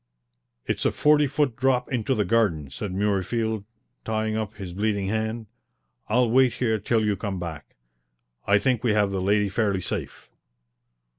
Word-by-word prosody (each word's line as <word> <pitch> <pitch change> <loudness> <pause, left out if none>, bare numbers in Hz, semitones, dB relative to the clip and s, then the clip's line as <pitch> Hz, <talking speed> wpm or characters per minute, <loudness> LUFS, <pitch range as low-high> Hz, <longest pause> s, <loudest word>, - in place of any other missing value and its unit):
"It's - - -2
a - - +2
forty 150 -1 +4
foot 145 -3 0
drop 130 0 +1
into 125 +2 0
the 105 -3 +1
garden," 90 -10 +1
said 105 -3 -5
Murreyfield, 105 +2 -1 0.4
tying 110 0 -1
up 110 -1 -3
his 95 -4 -7
bleeding 100 0 -1
hand. 110 +1 -2 0.6
"I'll 120 +3 +3
wait 130 -1 +4
here 110 -3 0
till 110 +2 +1
you 105 -1 +1
come 100 -2 -4
back. 80 -4 -7 0.7
I 100 +1 +5
think 125 0 0
we 115 -4 +2
have 105 -2 +2
the 95 -1 -2
lady 105 +2 +2
fairly 100 -1 0
safe." - - -5
110 Hz, 160 wpm, -25 LUFS, 100-120 Hz, 0.7 s, I